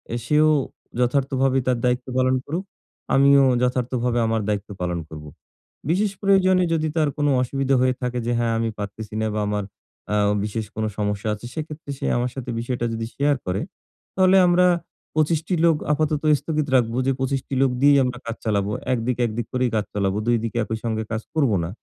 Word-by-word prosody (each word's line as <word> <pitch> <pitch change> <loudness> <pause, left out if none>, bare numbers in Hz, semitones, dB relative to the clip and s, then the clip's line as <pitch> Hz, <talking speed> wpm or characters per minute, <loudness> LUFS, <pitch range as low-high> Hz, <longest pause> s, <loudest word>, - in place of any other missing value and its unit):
এ - - -1
সেও 150 +3 +4 0.5
যথার্থভাবে 135 +1 +1
তার 125 -1 +2
দায়িত্ব 125 +1 0
পালন 130 0 +3
করুক। 175 +6 -3 0.5
আমিও 140 0 +6 0.2
যথার্থভাবে 125 -1 0
আমার 110 0 0
দায়িত্ব 105 0 -2
পালন 90 -1 -1
করবো। 75 -1 -9 0.6
বিশেষ 195 +4 +2
প্রয়োজনে 190 -2 +4
যদি 160 -1 0
তার 155 -2 +3
কোনো 145 -1 +1
অসুবিধা 135 +2 0
হয়ে 130 0 +3
থাকে, 125 0 -2
যে 120 - 0
হ্যাঁ 115 -1 +1
আমি 115 0 0
পারতেছি 105 +1 -6
না, - - 0
বা 105 - -1
আমার 105 0 -1 0.5
অ্যা 105 - +1 0.3
বিশেষ 105 +1 -3
কোনো 110 0 -1
সমস্যা 105 0 -2
আছে, 105 +3 -8
সেক্ষেত্রে 155 -1 -7
সে - - -3
আমার 120 +1 -1
সাথে 130 -2 -6
বিষয়টা 120 0 -2
যদি 115 0 -3
শেয়ার 145 +1 +2
করে, 90 +3 -1 0.5
তাহলে 185 0 +5
আমরা 180 +1 +4 0.5
২৫ 155 +1 +2
টি 185 - +1
লোক 165 -2 +5 0.2
আপাতত 150 0 0 0.2
স্থগিত 155 -2 -2
রাখবো, 120 -2 +2
যে - - +4
২৫ 135 0 0
টি - - -6
লোক 135 -1 +3
দিয়েই 140 0 +6
আমরা 125 -1 -2
কাজ 115 -1 -4
চালাবো। 100 -2 0 0.2
১ 125 - +1
দিক, 125 -1 0
১ 115 - -2
দিক 120 -2 -2
করেই 125 -1 +1
কাজ 105 -1 0
চালাবো, 100 -1 0
২ 120 0 +4
দিকে 115 0 -3
একই 110 +1 -3
সঙ্গে 110 -1 -1
কাজ 110 -1 -2
করব 140 -7 +3
না। 85 - -3
125 Hz, 195 wpm, -23 LUFS, 110-145 Hz, 0.6 s, আমিও